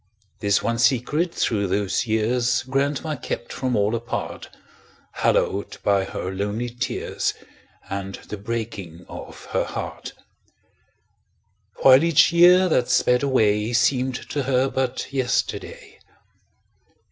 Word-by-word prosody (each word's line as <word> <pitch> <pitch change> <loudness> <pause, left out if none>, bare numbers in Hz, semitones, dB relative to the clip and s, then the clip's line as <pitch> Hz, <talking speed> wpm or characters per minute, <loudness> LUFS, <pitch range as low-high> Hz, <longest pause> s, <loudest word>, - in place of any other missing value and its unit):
This 100 -1 +1
one 115 0 -1
secret 135 +7 +2
through 105 -10 0
those 100 +4 -1
years 120 +3 +1
Grandma 140 +4 -1
kept 120 -2 -5
from 130 -2 -1
all 105 +1 +1
apart, 115 0 -4 0.6
Hallowed 100 +1 0
by 100 -1 +2
her 95 - -5
lonely 105 +5 -3
tears 125 +1 -2 0.5
And 95 0 -5
the 105 - -8
breaking 100 -5 -5
of - - -10
her - - +1
heart; - - -6 1.7
While 135 +2 +8
each 165 0 +4
year 180 +2 +6
that 125 -7 +1
sped 125 0 +3
away 110 -5 +2
Seemed 125 +1 +2 0.2
to 145 - -1
her 130 0 +1
but 130 +1 -3
yesterday. 130 -3 -2
120 Hz, 115 wpm, -23 LUFS, 105-130 Hz, 1.7 s, While